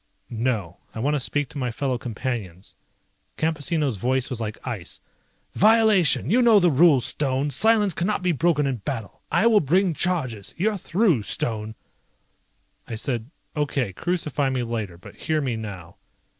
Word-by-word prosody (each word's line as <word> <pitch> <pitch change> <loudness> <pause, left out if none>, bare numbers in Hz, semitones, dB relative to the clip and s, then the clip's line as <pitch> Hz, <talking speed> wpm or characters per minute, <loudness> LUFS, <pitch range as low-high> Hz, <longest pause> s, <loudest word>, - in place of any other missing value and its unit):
"No. 110 -7 -2 0.2
I - - -4
want 140 +6 +1
to 150 - +1
speak 145 +2 -1
to 150 -3 -7
my 125 -2 -1
fellow 125 +1 -2
Companions." 110 -6 -5 0.6
Campesino's 155 - 0
voice 130 +5 0
was 120 -2 -3
like 105 -1 -4
ice. 110 -9 -5 0.5
"Violation! 215 -8 +4
You 250 +4 +4
know 230 -4 +6
the 175 -3 +3
rules, 140 -3 +5
Stone. 140 0 0
Silence 210 - +3
cannot 185 +4 -1
be 180 - +2
broken 160 -1 +2
in 135 -3 -1
battle. 115 -1 -6
I - - +3
will 225 -2 +6
bring 180 +4 +2
charges. 130 - -1
You're 210 +4 +1
through, 180 - +1
Stone." 110 +1 -3 1.1
I 115 - -5
said, 115 +1 -2 0.3
"Okay, 140 -8 -1
crucify 150 - -1
me 130 -2 -1
later. 110 -7 -4
But 85 - -14
hear 155 -1 -1
me 130 -5 -1
now." 95 -6 -8
135 Hz, 155 wpm, -24 LUFS, 115-175 Hz, 1.1 s, know